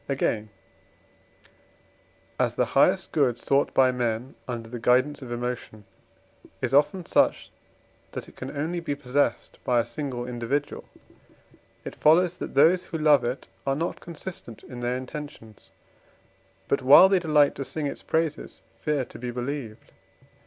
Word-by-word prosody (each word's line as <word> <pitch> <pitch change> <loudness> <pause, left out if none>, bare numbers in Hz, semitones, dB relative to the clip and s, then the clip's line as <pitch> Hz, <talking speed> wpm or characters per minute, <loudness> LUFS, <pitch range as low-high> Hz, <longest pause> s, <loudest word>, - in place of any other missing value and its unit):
Again, 110 -5 -1 1.9
as - - +1
the - - +2
highest - - +3
good 130 -6 +2
sought 140 +3 +1
by 130 -1 +5
men 120 0 -2
under 120 -2 -5
the 120 +1 -7
guidance 130 +5 +2
of 125 -2 -8
emotion 120 -3 -5 0.7
is 130 0 -2
often 165 +6 +3
such, - - +1 0.6
that - - -6
it - - -16
can - - -7
only 165 +4 -2
be 165 -4 -3
possessed 140 0 -1
by 125 -1 +2
a 115 - 0
single 120 0 -5
individual, 125 +4 -3 1.0
it - - -6
follows 170 +3 +4
that - - -7
those 165 +6 +5
who 165 - -5
love 150 -4 +4
it 125 +3 -3 0.2
are 135 - +2
not 165 +4 -3
consistent 170 - -9
in 125 - -9
their 120 +1 -1
intentions, 130 -5 -9 1.0
but, 140 - +1
while 140 +8 +9
they 190 -1 +3
delight 150 -4 +3
to 135 - -5
sing 150 +2 -4
its 140 - -4
praises, 160 -1 -2 0.2
fear 150 -4 -1
to - - -13
be 125 +1 -4
believed. 120 -2 -5
135 Hz, 150 wpm, -26 LUFS, 120-150 Hz, 1.9 s, while